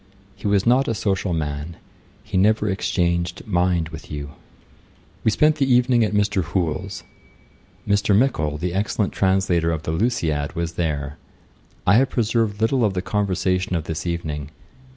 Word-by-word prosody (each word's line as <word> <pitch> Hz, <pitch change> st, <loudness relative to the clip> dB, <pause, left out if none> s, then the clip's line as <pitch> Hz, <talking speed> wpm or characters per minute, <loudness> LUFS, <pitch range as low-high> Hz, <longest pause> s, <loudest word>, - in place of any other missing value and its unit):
He -, -, -5 dB
was 100 Hz, -1 st, +2 dB
not 125 Hz, +3 st, +4 dB
a 115 Hz, -, 0 dB
social 95 Hz, -3 st, -1 dB
man. 75 Hz, 0 st, -3 dB, 0.5 s
He 105 Hz, -, -7 dB
never 105 Hz, +3 st, +3 dB
exchanged 85 Hz, -3 st, -1 dB
mind 90 Hz, -4 st, +1 dB
with 80 Hz, 0 st, -10 dB
you.' 75 Hz, -1 st, -6 dB, 0.9 s
We -, -, +3 dB
spent 150 Hz, +8 st, +3 dB
the 135 Hz, -2 st, +1 dB
evening 125 Hz, -1 st, +4 dB
at 110 Hz, -, 0 dB
Mr. 105 Hz, -2 st, +1 dB
Hoole's. 85 Hz, -2 st, -2 dB, 0.8 s
Mr. 100 Hz, 0 st, +3 dB
Mickle, 80 Hz, -, +1 dB
the 85 Hz, +3 st, -3 dB
excellent 100 Hz, +1 st, -1 dB
translator 95 Hz, -3 st, +2 dB
of 80 Hz, -1 st, -3 dB
The -, -, -2 dB
Lusiad, 80 Hz, -, -1 dB
was 85 Hz, 0 st, -2 dB
there. 75 Hz, -4 st, -2 dB, 0.7 s
I 100 Hz, +4 st, +5 dB
have 135 Hz, +2 st, +3 dB
preserved 110 Hz, -3 st, 0 dB
little 120 Hz, +3 st, +2 dB
of 100 Hz, -3 st, +1 dB
the 90 Hz, -, -1 dB
conversation 95 Hz, -1 st, 0 dB
of 85 Hz, -, -1 dB
this 80 Hz, +2 st, -4 dB
evening. 75 Hz, -4 st, -3 dB
95 Hz, 155 wpm, -22 LUFS, 80-105 Hz, 0.9 s, I